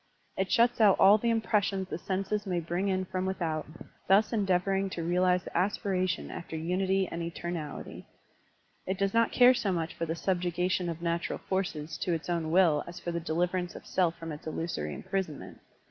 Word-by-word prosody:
It 190 0 -1
shuts 235 0 +3
out 205 -3 +6
all 200 +3 +7
the 235 - 0
impressions 205 -4 +1
the - - -4
senses 195 +3 -2
may 180 -2 0
bring 175 +4 -2
in 185 -1 0
from 185 0 -3
with 190 - -3
out, 160 -3 -2 0.4
thus 205 +5 +4
endeavoring 195 -1 +1
to 170 -3 -4
realize 180 +1 +2
the - - -10
aspiration 185 -1 0
after 170 - -7
unity 185 +4 0
and 170 - -5
etemality. 170 -2 -5 0.8
It 190 +1 -1
does 195 0 0
not 230 0 +3
care 250 0 +7
so 210 -5 -1
much 165 -2 -2
for 165 - -4
the 165 - -2
subjugation 180 0 0
of 165 0 -5
natural 170 0 -1
forces 160 -5 -3
to 175 - 0
its 165 +1 -4
own 165 -2 -1
will 165 -4 +4
as 175 - -8
for 175 - -4
the 170 - -2
deliverance 175 +2 -1
of - - -10
self 175 -3 +1
from 165 -1 -6
its 150 +1 -8
illusory 155 - -3
imprisonment. 185 -6 -4
180 Hz, 190 wpm, -29 LUFS, 170-195 Hz, 0.8 s, all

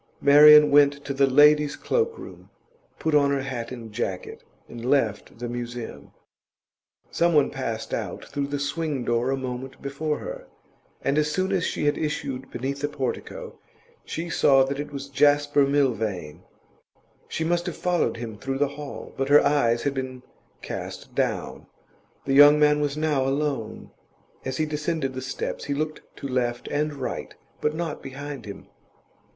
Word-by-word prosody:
Marian 150 +1 +8
went 145 0 +4
to 140 - -2
the 135 0 +3
ladies' 150 +2 +5
cloak 460 -1 -1
room, - - -11 0.5
put 160 - -1
on 145 -1 +4
her 140 -1 0
hat 125 -4 -5
and 115 -3 -8
jacket, 95 -5 -4 0.2
and 120 -1 -9
left 120 -7 0
the 120 +1 -5
Museum. 120 0 -6 1.0
Some 170 -1 +2
one 145 - +4
passed 115 -5 -4
out - - -4
through 140 -1 -3
the 145 0 -3
swing 145 -2 -2
door 120 +2 +1
a 135 - 0
moment 130 0 -6
before 150 +2 -3
her, - - -8 0.6
and 140 +2 +2
as 150 0 +1
soon 185 +3 0
as 190 -3 +1
she - - -2
had 145 - +1
issued 135 -3 -3
beneath 135 +3 -4
the 145 - +1
portico, 135 -3 -5 0.4
she 165 +2 -5
saw 135 -5 +4
that 135 +1 -3
it 145 0 -5
was 140 -1 -6
Jasper 145 0 +3
Milvain; 110 - -1 0.9
she 160 - -3
must 175 +2 0
have 175 - -4
followed 180 -8 0
him 115 -3 -7
through 135 +4 -3
the 145 0 +1
hall, 145 0 -8
but 135 +1 -1
her 145 +1 +6
eyes 120 -5 +2
had 140 - 0
been 130 -1 -5 0.4
cast - - -7
down. - - -2 0.6
The 135 - 0
young 145 +2 +8
man 150 0 +4
was 145 0 -1
now 150 -4 +1
alone; 135 -5 -2 0.5
as 130 0 -3
he 155 - +1
descended 150 -2 -2
the 130 - -5
steps 130 +1 -4
he 140 - -2
looked 155 +1 -3
to 140 - -6
left 120 -2 -1
and 150 +1 0
right, 130 -2 -5 0.3
but 150 +1 0
not 165 -2 -4
behind 140 -2 -7
him. 100 - -9
140 Hz, 170 wpm, -25 LUFS, 130-150 Hz, 1.0 s, Marian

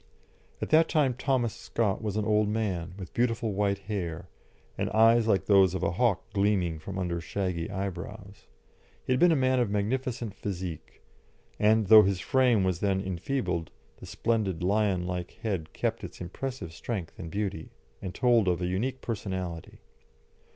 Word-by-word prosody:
At - - -5
that 160 +1 +5
time 145 -5 +2
Thomas 125 -3 0
Scott 105 -5 -1
was 105 -2 -2
an 105 - 0
old 105 -1 +2
man, 95 -5 -2
with 95 -4 -9
beautiful 115 -2 0
white 100 0 +1
hair, 90 -4 -5 0.5
and - - -2
eyes 115 +1 +5
like 100 -3 +2
those 95 -3 +5
of - - -3
a - - +1
hawk 100 +1 +1
gleaming 100 -5 +1
from 95 +5 -7
under 85 -2 -2
shaggy 90 -2 -3
eyebrows. 100 +1 -6 0.6
He 130 - +1
had 125 - +1
been 175 -1 +6
a - - +4
man 130 -2 +2
of 120 -4 +1
magnificent 115 +2 -2
physique, 90 -6 -6 0.6
and, 110 +1 +4
though 110 +2 +9
his 95 -2 +1
frame 120 0 +3
was 95 -2 0
then 100 -2 +1
enfeebled, 95 -1 -2 0.3
the - - -11
splendid 105 -7 -1
lion 100 -2 +1
like 90 -1 -4
head 95 -8 -2
kept - - -2
its - - -8
impressive 95 0 -5
strength 95 -2 -5
and 85 -3 -6
beauty, 100 -4 -3 0.3
and 95 -2 -6
told 120 -5 +3
of 90 -1 +2
a 90 - -1
unique 115 +9 -2
personality. 95 -7 -5
100 Hz, 165 wpm, -28 LUFS, 90-115 Hz, 0.6 s, though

